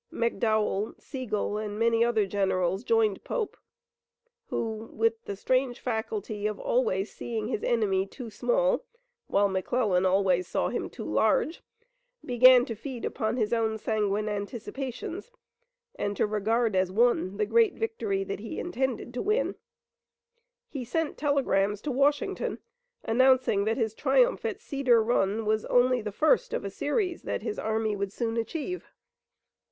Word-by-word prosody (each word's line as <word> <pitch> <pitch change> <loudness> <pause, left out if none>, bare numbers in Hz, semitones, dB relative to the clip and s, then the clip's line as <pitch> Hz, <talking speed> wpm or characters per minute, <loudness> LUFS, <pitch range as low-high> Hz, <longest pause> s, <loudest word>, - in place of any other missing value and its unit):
McDowell, 220 -2 0
Sigel 215 -5 -3
and 210 -1 -4
many 230 0 +3
other 230 -3 +2
generals 190 0 0
joined 225 -4 +2
Pope, 450 -4 -3 0.9
who, 220 -1 -3
with 225 0 0
the 200 - -4
strange 255 +4 0
faculty 220 - -3
of 215 -1 -3
always 205 -5 0
seeing 225 -2 -4
his 235 - -2
enemy 200 -5 +1
too 235 +2 -9
small, - - +1 0.4
while 200 +1 +3
McClellan 190 0 +1
always 185 -1 +2
saw 170 - 0
him - - -3
too - - -8
large, 405 -10 +1 0.6
began 250 0 +7
to 230 - -4
feed 240 +2 -6
upon 220 +2 -2
his 220 -1 0
own 220 -1 +1
sanguine 210 -1 -1
anticipations, 250 - -5 0.6
and 205 0 -3
to - - +3
regard 215 +1 +1
as 185 -1 +2
won 205 -3 +2
the 210 - +1
great 230 +1 +3
victory 220 -3 -2
that 195 0 -5
he 220 +1 -6
intended 265 -7 -2
to 245 - -2
win. 430 +5 +1 1.1
He 270 -4 -5
sent 310 +5 -2
telegrams 210 -9 +1
to 295 - -3
Washington 280 +3 +1 0.5
announcing 255 -3 +3
that 225 +1 0
his 220 -4 0
triumph - - +2
at - - -3
Cedar 255 -6 +2
Run 220 -1 +1
was 215 0 +1
only 250 0 +3
the 210 -1 -4
first 385 - +2
of - - -3
a 200 - -4
series 350 - -1
that - - -3
his 425 - -3
army 220 -1 0
would 200 -1 -3
soon 225 +1 -2
achieve. 315 - -3
225 Hz, 145 wpm, -28 LUFS, 205-255 Hz, 1.1 s, began